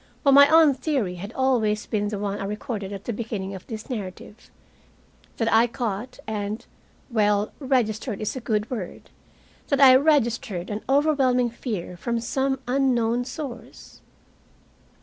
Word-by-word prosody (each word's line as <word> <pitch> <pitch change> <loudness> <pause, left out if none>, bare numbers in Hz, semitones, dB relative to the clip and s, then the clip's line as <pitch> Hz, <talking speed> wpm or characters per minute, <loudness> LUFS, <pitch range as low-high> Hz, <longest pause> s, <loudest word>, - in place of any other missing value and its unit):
But 280 - +5
my 280 +1 +8
own 315 -2 +6
theory 255 - -2
had 200 +5 -7
always 230 -5 +1
been 205 -1 -1
the 205 0 -3
one 200 0 -3
I - - -3
recorded 210 -1 -4
at 200 -1 -7
the 235 - -3
beginning 205 -3 -4
of 190 - -10
this 220 -2 -7
narrative 210 -2 -7 0.9
that 225 -1 +1
I 225 +2 +5
caught 235 +1 -4
and 210 0 -4 0.5
well, 210 -2 +2
registered 240 -5 0
is 215 - -3
a - - -3
good 215 -1 -1
word 210 -8 -6 0.6
that 280 - +1
I 265 -2 +9
registered 240 - +1
an 210 +1 -3
overwhelming 270 -4 +3
fear 205 -7 -5
from 235 +5 -2
some 265 +3 -1
unknown 245 -2 +1
source. 260 -4 -9
230 Hz, 150 wpm, -24 LUFS, 205-260 Hz, 0.9 s, I